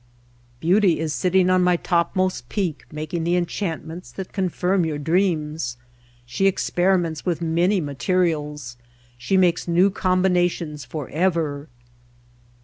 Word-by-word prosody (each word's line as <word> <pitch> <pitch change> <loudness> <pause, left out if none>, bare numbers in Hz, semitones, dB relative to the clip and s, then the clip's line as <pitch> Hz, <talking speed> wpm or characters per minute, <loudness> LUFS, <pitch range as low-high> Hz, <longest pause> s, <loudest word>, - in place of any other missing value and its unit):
"Beauty 180 +2 +3
is 160 -2 -2
sitting 185 +2 +2
on 185 0 +4
my 180 0 +4
topmost 175 -5 0
peak 180 -8 -2
making 155 +2 -4
the 170 +2 +1
enchantments 175 -1 -3
that 190 -1 -8
confirm 185 -1 0
your 155 -2 -2
dreams. 155 -5 0 0.5
She 125 +11 +1
experiments 175 -4 +1
with 175 -3 -1
many 170 +4 +1
ma 145 -4 -4
terials; 150 -6 -1 0.4
she 125 +11 0
makes 175 -3 +2
new 180 +4 +4
combinations 180 -5 0
for 150 -5 -6
ever. 160 -4 -1
170 Hz, 125 wpm, -22 LUFS, 155-185 Hz, 0.5 s, on